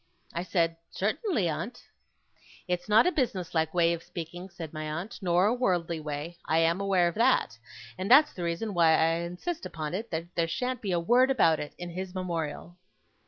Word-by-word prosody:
I 170 - -2
said: 165 -2 0
'Certainly, 220 - 0
aunt.' 170 +10 -4 0.8
'It's 180 +2 -2
not 215 +2 +6
a 360 - +3
business 190 - -1
like 160 -1 +1
way 170 -1 +3
of 170 - -5
speaking,' 175 +3 -8
said 165 -4 -8
my 155 0 -4
aunt, 175 +9 -5
'nor 180 0 +3
a 215 - +3
worldly 175 -9 0
way. 150 +3 -5
I 160 - +2
am 165 +3 +2
aware 190 -3 +3
of 170 - -2
that; 230 - +2 0.4
and 190 +2 -2
that's 295 +5 +7
the 180 - -7
reason 170 +6 -2
why 165 -2 +5
I 165 +1 +3
insist 180 - -4
upon 155 -1 -5
it, 220 +5 -4
that 165 +1 -5
there 170 -1 +1
shan't 250 +9 -2
be 200 - -2
a 175 - +2
word 245 +9 +4
about 165 -12 +4
it 150 - -6
in 175 -1 -6
his 185 +1 -6
Memorial. 175 -1 -4
175 Hz, 200 wpm, -28 LUFS, 165-205 Hz, 0.8 s, that's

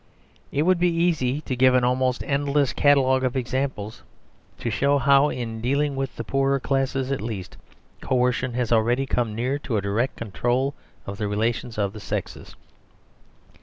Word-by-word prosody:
It 145 - +1
would 185 +1 +3
be 180 0 +3
easy 160 -5 +1
to 130 - -3
give 130 0 +4
an 125 - +3
almost 125 0 +1
endless 140 -1 +1
catalogue 130 -2 +3
of 130 0 -1
examples, 125 -4 -3 0.6
to 115 - -3
show 140 +6 +2
how, 140 +2 +4
in 115 -4 -5
dealing 140 +4 0
with 135 -1 -3
the - - -5
poorer 135 +3 +1
classes 135 0 -1
at 135 - -1
least, 105 -5 -6 0.5
coercion 125 -1 0
has 125 -2 -1
already 120 +4 +2
come 120 -5 -1
near 130 +5 -1
to 125 -6 -2
a - - 0
direct 105 +6 -1
control 120 +5 -1 0.3
of 100 0 -7
the 105 - -1
relations 110 +2 -2
of 100 -2 -1
the 110 - -8
sexes. - - -5
130 Hz, 165 wpm, -24 LUFS, 115-140 Hz, 0.6 s, give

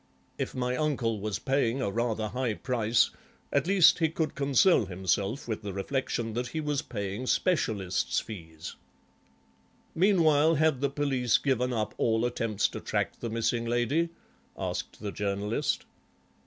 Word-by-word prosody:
If - - -3
my 125 0 -1
uncle 125 -7 0
was 105 -1 -2
paying 135 -2 0
a 115 -7 -1
rather 110 -1 -1
high 125 -3 -1
price, 115 -2 +2 0.4
at 140 +2 +2
least 190 -3 +6
he 160 -2 +3
could 160 -1 -2
console 140 - +3
himself 95 - -1
with 110 -2 -3
the 100 -2 -5
reflection 115 +2 -2
that 120 +2 -2
he 155 - -4
was 150 -2 -1
paying 100 +2 -4
specialists' 105 - +1
fees." 80 -6 -9 1.2
"Meanwhile 165 -4 +4
had 155 -3 +2
the 140 - +2
police 135 -4 +1
given 125 -2 0
up 110 -3 -1
all 115 0 +2
attempts 115 -4 0
to - - -6
track - - -2
the 115 - -4
missing 115 +1 0
lady?" 120 +8 +1 0.5
asked - - -4
the 105 -2 -3
Journalist. 105 +7 -1
120 Hz, 145 wpm, -29 LUFS, 110-140 Hz, 1.2 s, least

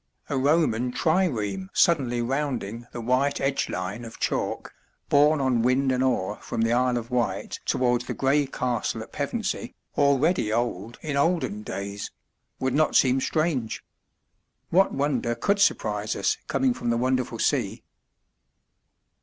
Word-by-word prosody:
A 145 - -1
Roman 130 -4 +2
trireme 165 - 0
suddenly 130 -9 +2
rounding 120 -4 -3
the - - -6
white 130 +4 +1
edge 135 0 0
line 100 +5 -4
of 115 -1 -10
chalk, - - -2 0.4
borne 150 +2 +5
on 130 -4 +2
wind 130 +3 +2
and 130 0 +1
oar 105 -6 0
from 115 - -3
the 115 +1 +2
Isle 125 0 +2
of 120 +1 -6
Wight 125 -2 -1
towards 125 -1 +1
the - - -3
gray 140 +1 +2
castle 125 -3 -2
at - - -15
Pevensey - - -3 0.2
(already 140 -3 +2
old 115 -1 -2
in 150 -3 -2
olden 140 - +1
days), 100 -1 -5 0.5
would 130 -1 0
not 155 +2 +2
seem 130 0 +4
strange. 155 -9 -1 0.9
What 190 +3 +4
wonder 135 -4 0
could 200 - +1
surprise 200 - +1
us - - +1
coming 260 -2 +1
from 120 - -3
the 115 - +2
wonderful 130 0 0
sea? - - 0
130 Hz, 145 wpm, -25 LUFS, 120-145 Hz, 0.9 s, borne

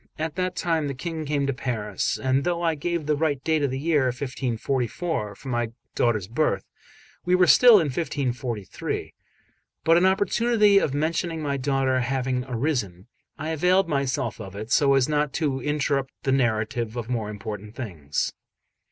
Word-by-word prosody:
At 160 0 -3
that 185 +1 -2
time 165 -4 0
the 140 - -4
King 160 +2 -4
came 145 -1 0
to 140 - 0
Paris; 120 -5 -2
and 130 +1 +1
though 175 +1 -1
I 165 -1 +2
gave 170 +1 -2
the 150 0 +2
right 145 -2 0
date 160 -2 +1
of 140 - +1
the 130 - -3
year 150 -1 +2
1544 125 - -2
for 135 - -12
my 120 -2 -1 0.2
daughter's 110 -6 +1
birth, 135 +8 0 0.6
we 180 +1 +3
were 180 0 +5
still 245 +6 +8
in 190 -7 +6
1543; 125 - -3 0.7
but 165 +1 +5
an 180 +2 +5
opportunity 205 +2 +3
of 140 -7 -1
mentioning 165 +2 -1
my 140 -1 -1
daughter 135 -1 +1
having 130 0 -1
arisen, 120 - -2 0.3
I 155 +2 -4
availed 180 +4 +3
myself 140 -6 -1
of 95 -2 -9
it, 110 +3 -7
so 140 -1 +4
as 135 -2 +3
not 150 -2 0
to 140 -5 -1
interrupt 145 -2 -1
the 135 - +1
narrative 115 -2 0
of 115 -2 -4
more 115 -4 -2
important 105 +1 -7
things. 80 - -3
135 Hz, 170 wpm, -25 LUFS, 120-160 Hz, 0.7 s, still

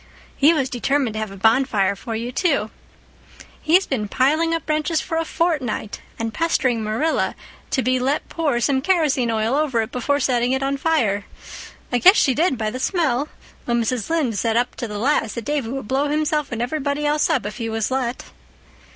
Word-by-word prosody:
He 290 +3 +5
was 285 -6 +1
determined 265 -1 0
to 215 - -4
have 215 -1 -3
a 195 - -10
bonfire 215 -2 +2
for 225 +3 -6
you, 235 +2 -4
too. 275 - 0 0.9
He's 355 +5 +4
been 215 -6 -2
piling 310 +9 +2
up 330 -2 -2
branches 310 +1 0
for 325 0 -3
a 330 - +1
fortnight 290 -12 -2 0.2
and 225 0 -3
pestering 255 -8 +1
Marilla 225 +10 0 0.3
to 260 - 0
be 255 0 +1
let 270 +4 -1
pour 300 -7 -1
some 265 +2 +1
kerosene 300 -7 +2
oil 225 +1 0
over 285 -5 +1
it 220 - -8
before 285 +4 0
setting 245 -2 +1
it 265 0 -1
on 275 +1 0
fire. 240 -10 +1 0.7
I 245 - +2
guess 370 - +7
she 270 - +3
did, 305 -1 +1
by 215 -1 -2
the 255 - -5
smell, 300 -4 0 0.4
though 240 - 0
Mrs. 235 -1 -1
Lynde 285 -10 0
said 225 -1 +1
up 245 +1 0
to 240 - -4
the 210 -1 -6
last 225 -2 0
that 235 - -5
Davy 290 -6 -1
would 265 -3 -5
blow 275 +4 +1
himself 300 0 0
and 235 0 -2
everybody 285 +2 -2
else 300 +2 +2
up 265 -10 +1
if 210 +1 -5
he 230 -2 -3
was 225 +1 -2
let." 255 -2 -2
260 Hz, 200 wpm, -21 LUFS, 230-300 Hz, 0.9 s, guess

